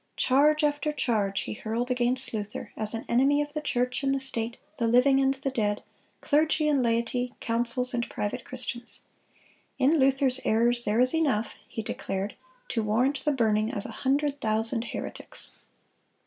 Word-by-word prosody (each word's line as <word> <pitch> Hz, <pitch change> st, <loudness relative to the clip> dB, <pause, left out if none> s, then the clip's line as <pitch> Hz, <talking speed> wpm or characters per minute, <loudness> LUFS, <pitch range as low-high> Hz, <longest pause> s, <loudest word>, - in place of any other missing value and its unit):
Charge 300 Hz, +4 st, +3 dB
after 295 Hz, +1 st, +1 dB
charge 210 Hz, -9 st, 0 dB
he -, -, -5 dB
hurled 230 Hz, +4 st, -3 dB
against 250 Hz, +1 st, +1 dB
Luther 210 Hz, -1 st, -5 dB
as 215 Hz, +1 st, -3 dB
an 225 Hz, -, -5 dB
enemy 270 Hz, +4 st, +3 dB
of 295 Hz, 0 st, -3 dB
the 305 Hz, -, -3 dB
church 250 Hz, -3 st, -1 dB
and 275 Hz, 0 st, +1 dB
the -, -, -1 dB
state, 235 Hz, -3 st, -3 dB, 0.2 s
the 230 Hz, -, 0 dB
living 255 Hz, +4 st, +4 dB
and 270 Hz, 0 st, +2 dB
the 270 Hz, 0 st, -3 dB
dead, 210 Hz, -4 st, -1 dB, 0.4 s
clergy 305 Hz, +1 st, +2 dB
and 290 Hz, -3 st, +2 dB
laity, 240 Hz, +1 st, -1 dB
councils 240 Hz, +2 st, +3 dB
and 240 Hz, -1 st, -1 dB
private 230 Hz, +4 st, -3 dB
Christians. 245 Hz, -1 st, 0 dB, 0.8 s
"In 295 Hz, +4 st, +3 dB
Luther's 265 Hz, -1 st, +3 dB
errors 240 Hz, +2 st, +2 dB
there 210 Hz, +2 st, +1 dB
is 255 Hz, +1 st, +5 dB
enough," 275 Hz, -9 st, 0 dB
he 225 Hz, -, -5 dB
declared, 195 Hz, -1 st, -4 dB, 0.4 s
to 225 Hz, -, 0 dB
warrant 250 Hz, +6 st, 0 dB
the 300 Hz, -, +3 dB
burning 220 Hz, -4 st, +1 dB
of 200 Hz, -, -5 dB
"a -, -, -6 dB
hundred 285 Hz, +1 st, -1 dB
thousand 225 Hz, +2 st, +2 dB
heretics." -, -, -6 dB
250 Hz, 165 wpm, -27 LUFS, 225-275 Hz, 0.8 s, is